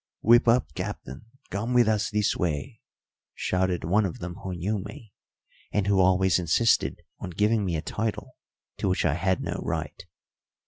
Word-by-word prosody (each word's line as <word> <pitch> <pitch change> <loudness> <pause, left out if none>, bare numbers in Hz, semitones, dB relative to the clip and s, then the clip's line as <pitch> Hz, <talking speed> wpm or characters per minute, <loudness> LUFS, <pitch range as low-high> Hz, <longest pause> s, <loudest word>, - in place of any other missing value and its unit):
"Whip 120 +2 +5
up, 120 +2 +3
Captain, 65 - -6 0.3
come 110 +6 -2
with 120 -2 +5
us 110 -1 +1
this 105 -1 +1
way," 90 - -3 0.5
shouted 90 -1 0
one 95 +7 +2
of 95 -4 -3
them 85 0 -6
who 95 -2 -5
knew 100 +5 -2
me, 105 +1 -10 0.6
and 105 -2 0
who 100 -1 +2
always 95 0 +4
insisted 90 +7 +2 0.2
on - - -6
giving 105 +4 +1
me 90 -4 -1
a 80 - -3
title 110 +3 -4 0.4
to - - -1
which 90 - 0
I 80 - +3
had 95 +3 0
no - - -3
right. - - -4
95 Hz, 170 wpm, -26 LUFS, 90-110 Hz, 0.6 s, Whip